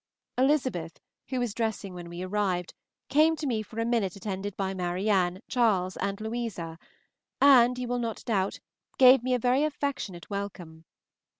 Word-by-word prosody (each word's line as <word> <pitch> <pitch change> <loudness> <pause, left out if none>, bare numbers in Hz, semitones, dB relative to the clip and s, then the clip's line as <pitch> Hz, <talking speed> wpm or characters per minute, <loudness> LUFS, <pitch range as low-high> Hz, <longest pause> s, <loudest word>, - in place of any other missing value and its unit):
Elizabeth, 255 - 0 0.3
who 255 +1 -2
was 240 -4 -1
dressing 220 -4 -3
when 175 -1 -8
we 175 +1 -6
arrived, 185 -2 -1 0.3
came 310 +3 +4
to 310 - -5
me 235 -5 0
for 220 +1 -8
a 230 - +1
minute 225 -6 0
attended 200 -1 -5
by 195 -1 -1
Marianne, 185 +1 0
Charles, 200 -7 +1
and 200 +1 -2
Louisa, 220 -8 -4 0.6
and, 250 -3 +6
you 250 -1 -3
will 245 0 -1
not 230 -2 -4
doubt, 195 -4 0 0.4
gave 260 -1 +8
me 255 +1 +1
a - - +2
very 250 +4 +2
affectionate 280 - -3
welcome. 180 -5 -6
215 Hz, 160 wpm, -28 LUFS, 185-245 Hz, 0.6 s, gave